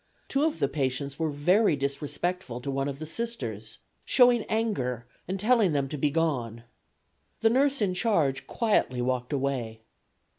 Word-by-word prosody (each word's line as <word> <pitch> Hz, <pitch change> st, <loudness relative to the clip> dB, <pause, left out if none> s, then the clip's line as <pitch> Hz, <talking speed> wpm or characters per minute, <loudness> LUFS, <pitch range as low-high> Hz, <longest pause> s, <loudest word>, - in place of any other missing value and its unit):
Two 275 Hz, +3 st, +1 dB
of 320 Hz, -, 0 dB
the 140 Hz, -, +1 dB
patients 140 Hz, 0 st, -2 dB
were 160 Hz, -1 st, 0 dB
very 175 Hz, +6 st, +3 dB
disrespectful 140 Hz, +1 st, -3 dB
to 140 Hz, -, -3 dB
one 135 Hz, +1 st, -1 dB
of 140 Hz, -1 st, -4 dB
the 155 Hz, -, -6 dB
Sisters, 115 Hz, -, -5 dB, 0.3 s
showing 245 Hz, -3 st, +4 dB
anger 135 Hz, -, -1 dB, 0.2 s
and 190 Hz, +2 st, -3 dB
telling 215 Hz, -4 st, +3 dB
them 140 Hz, -2 st, 0 dB
to -, -, -4 dB
begone. 140 Hz, -6 st, -1 dB, 0.8 s
The 225 Hz, -, +4 dB
nurse 275 Hz, -1 st, +3 dB
in 185 Hz, -3 st, +1 dB
charge 160 Hz, -, +1 dB
quietly 205 Hz, -, +1 dB
walked 125 Hz, 0 st, -1 dB
away. 130 Hz, -6 st, -2 dB
145 Hz, 150 wpm, -27 LUFS, 130-210 Hz, 0.8 s, showing